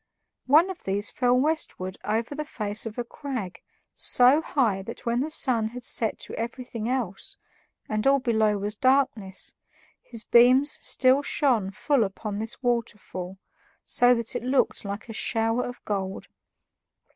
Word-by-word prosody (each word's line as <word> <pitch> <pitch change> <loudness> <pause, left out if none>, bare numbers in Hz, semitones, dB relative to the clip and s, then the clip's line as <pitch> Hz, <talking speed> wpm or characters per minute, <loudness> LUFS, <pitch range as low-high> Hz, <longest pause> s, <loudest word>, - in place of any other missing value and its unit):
One 320 +8 +5
of 365 - -11
these 200 +2 -1
fell 245 -1 +2
westward 255 -10 -1
over 225 +5 -1
the 300 +1 -3
face 215 -7 -4
of 220 - -8
a 240 - -1
crag 235 -8 -6 0.3
so 255 +5 +5
high 230 -11 0
that 230 +6 -9
when 235 0 +1
the 290 +4 -1
sun 245 -7 +1
had 245 +2 -8
set 225 -2 -1
to - - -6
everything 235 -1 -5
else, 245 -7 -3 0.5
and 215 +3 -1
all 275 0 +5
below 220 -5 +1
was 205 +2 -3
darkness, 255 -7 0 0.5
his 230 -2 -9
beams 255 +5 +5
still 260 +2 +3
shone 255 -9 +1
full 265 +6 +1
upon 205 +1 -4
this 225 +4 -6
waterfall, 210 -6 -3 0.5
so 245 0 +5
that 230 -1 -2
it - - -1
looked 255 +3 +1
like 200 +2 -6
a 225 - -7
shower 225 +2 0
of 245 - -8
gold. 195 -2 -3
235 Hz, 155 wpm, -26 LUFS, 210-260 Hz, 0.5 s, One